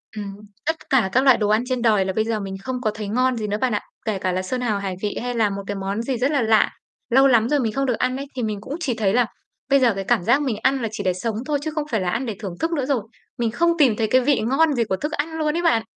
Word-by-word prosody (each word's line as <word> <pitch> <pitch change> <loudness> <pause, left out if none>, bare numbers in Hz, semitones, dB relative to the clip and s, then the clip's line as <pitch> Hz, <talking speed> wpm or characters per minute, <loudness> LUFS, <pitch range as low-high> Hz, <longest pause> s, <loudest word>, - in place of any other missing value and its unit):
Ừm, 200 -2 -5 0.3
tất 320 0 -3
cả 245 -8 +3
các 260 +2 +3
loại 265 -3 +6
đồ 210 -1 0
ăn 215 +3 +3
trên 255 -2 -1
đời 210 -5 +3
là 190 - -2
bây 220 +2 0
giờ 225 -1 -1
mình 195 -1 -5
không 255 -1 -3
có 215 - 0
thấy 215 -1 -6
ngon 250 +3 +1
gì 215 -1 -3
nữa 205 - -1
bạn 250 -4 +1
ạ. - - -1 0.2
Kể 215 -3 -1
cả 185 - -1
là 185 +1 -1
sơn 250 +7 -3
hào 215 -4 0
hải 195 -2 -3
vị 210 - -2
hay 245 0 -3
là 220 -3 +2
một 200 0 -5
cái 205 - -3
món 195 +2 -3
gì 250 +1 -2
rất 260 +5 +1
là 285 -4 +2
lạ, 220 -1 +4 0.4
lâu 270 +3 +6
lắm 235 -2 +4
rồi 295 -1 +2
mình 225 -4 -1
không 275 +3 0
được 250 - +1
ăn 255 +1 0
ấy, 275 - -5
thì 250 - -2
mình 210 -2 -3
cũng 280 - -5
chỉ 270 -8 -1
thấy 205 -3 0
là 245 0 +4 0.4
bây 275 0 +5
giờ 245 -5 +4
cái 195 - -4
cảm 185 - +1
giác 240 +9 +3
mình 255 -6 -1
ăn 265 0 +2
là 230 - -1
chỉ 205 - -5
để 185 -1 +1
sống 215 +5 -3
thôi 290 -1 0
chứ 315 - -3
không 305 - 0
phải 220 - +1
là 180 - -1
ăn 260 +8 -1
để 220 - -4
thưởng 190 -4 -5
thức 325 - -1
nữa 290 -6 0
rồi. 265 -4 +1 0.4
Mình 235 -2 0
không 340 +8 +2
tìm 265 -8 +4
thấy 220 0 0
cái 255 +3 +4
vị 275 +1 +2
ngon 285 +7 +2
gì 240 -3 +1
của 200 -4 -1
thức 300 +6 -3
ăn 290 +3 -2
luôn 305 -1 0
ấy - - 0
bạn. 230 -10 +3
235 Hz, 325 wpm, -22 LUFS, 210-270 Hz, 0.4 s, loại